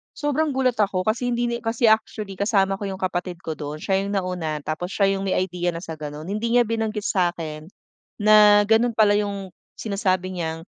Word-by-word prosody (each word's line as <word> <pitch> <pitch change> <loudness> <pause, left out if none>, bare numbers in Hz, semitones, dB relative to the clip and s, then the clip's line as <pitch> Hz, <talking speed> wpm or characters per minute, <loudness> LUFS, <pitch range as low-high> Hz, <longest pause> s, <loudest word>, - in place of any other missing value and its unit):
Sobrang 295 0 0
gulat 255 -2 +1
ako 200 -3 +1
kasi 245 +2 -1
hindi 240 0 0
na 235 - -1
kasi 225 0 +1
actually 215 -2 0
kasama 195 -1 +1
ko 205 - -5
'yung 190 -1 -5
kapatid 180 -1 -3
ko 160 -2 -5
dun, 150 +1 -6
siya 190 +2 +1
'yung 200 +1 -2
nauna 180 -6 -2
tapos 160 +5 -4
siya 200 -1 +3
'yung 195 - -4
may 190 - 0
idea 180 -1 -1
na 165 - -6
sa 165 -3 -7
ganun. 150 +2 -7
Hindi 220 +3 -1
niya 245 - +6
binanggit 225 -2 -1
sa'kin 170 -6 -2 0.6
na 210 0 +7
ganun 230 +2 +3
pala 210 -2 +4
'yung 200 -2 -3 0.2
sinasabi 185 -3 -2
niyang 165 -1 -3
195 Hz, 195 wpm, -23 LUFS, 175-220 Hz, 0.6 s, na